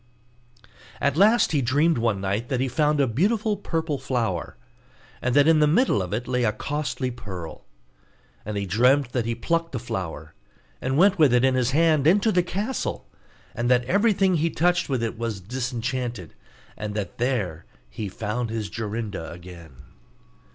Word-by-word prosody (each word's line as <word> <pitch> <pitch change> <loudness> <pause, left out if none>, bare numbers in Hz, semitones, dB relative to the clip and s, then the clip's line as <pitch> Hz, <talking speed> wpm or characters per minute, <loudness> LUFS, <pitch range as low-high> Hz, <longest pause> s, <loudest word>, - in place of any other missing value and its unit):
At 140 0 +1
last 215 +7 +4
he 145 -3 +2
dreamt 145 +5 +2
one 115 -4 0
night 100 +5 -2
that 130 - 0
he 135 - +1
found 150 +3 +1
a 140 - +4
beautiful 210 - +1
purple 160 -7 -3
flower, 115 - -2 0.6
and 125 0 0
that 145 +1 +5
in 160 -1 +5
the 150 - +4
middle 185 - +3
of 90 - -5
it 120 +4 -3
lay 125 -1 0
a 105 - +3
costly 130 +4 -3
pearl; 95 -9 -8 0.8
and 105 0 -4
he 100 - -2
dreamt 125 +7 +3
that 120 -3 -1
he 115 - -1
plucked 165 +6 -1
the 125 - -2
flower, 80 -9 -5 0.5
and 130 +1 -1
went 195 +2 +4
with 140 -6 +5
it 125 +1 +4
in 130 - +3
his 125 -1 +1
hand 155 0 +3
into 205 +6 +4
the 180 - +3
castle, 200 +8 -3 0.5
and 120 +1 -1
that 125 -1 +3
everything 195 - +2
he 165 +2 +1
touched 175 +1 +1
with 130 -4 0
it 115 0 -3
was 115 -4 -3
disenchanted, 120 - -4 0.4
and 105 -1 -5
that 105 +1 -5
there 105 -11 -1 0.2
he 100 - -6
found 110 +4 -3
his 110 -3 -4
Jorinda 105 -6 -4
again. 85 -6 -12
125 Hz, 170 wpm, -24 LUFS, 105-155 Hz, 0.8 s, that